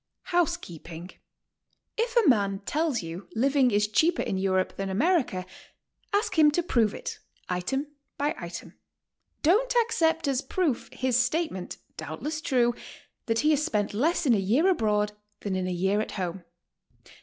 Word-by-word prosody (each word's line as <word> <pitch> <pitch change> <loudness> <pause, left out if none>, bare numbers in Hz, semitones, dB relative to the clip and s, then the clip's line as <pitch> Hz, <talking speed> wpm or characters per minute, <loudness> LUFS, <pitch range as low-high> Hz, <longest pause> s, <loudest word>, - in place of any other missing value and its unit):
HOUSEKEEPING. 180 - -2 0.8
If 470 +2 -1
a 455 -6 +5
man 200 -6 +3
tells 300 - 0
you 165 +4 -7
living 265 +2 +3
is 210 -1 +2
cheaper 325 +11 +2
in 190 - -2
Europe 190 -1 0
than 195 0 -3
America, 235 - +1 0.7
ask 405 -4 +1
him 300 -1 +8
to 350 - +1
prove 230 - +2
it - - -6 0.3
item 185 +11 -1 0.3
by 290 +2 0
item. 170 -1 -7 0.7
Don't 460 +10 +3
accept 325 -8 +1
as 270 -1 +1
proof 320 -9 -1
his 255 -1 +1
statement, 250 - -1 0.2
doubtless 220 - -4
true, 245 -5 +2 0.5
that 225 -1 +1
he 305 - +3
has 300 0 +2
spent 210 -7 -1
less 310 +10 +1
in 255 - +5
a 210 - +3
year 235 - +2
abroad 210 - +2 0.3
than 200 -2 -2
in 185 -1 -1
a - - -2
year 190 +4 +1
at - - -5
home. 180 -1 -4
240 Hz, 155 wpm, -27 LUFS, 195-320 Hz, 0.8 s, him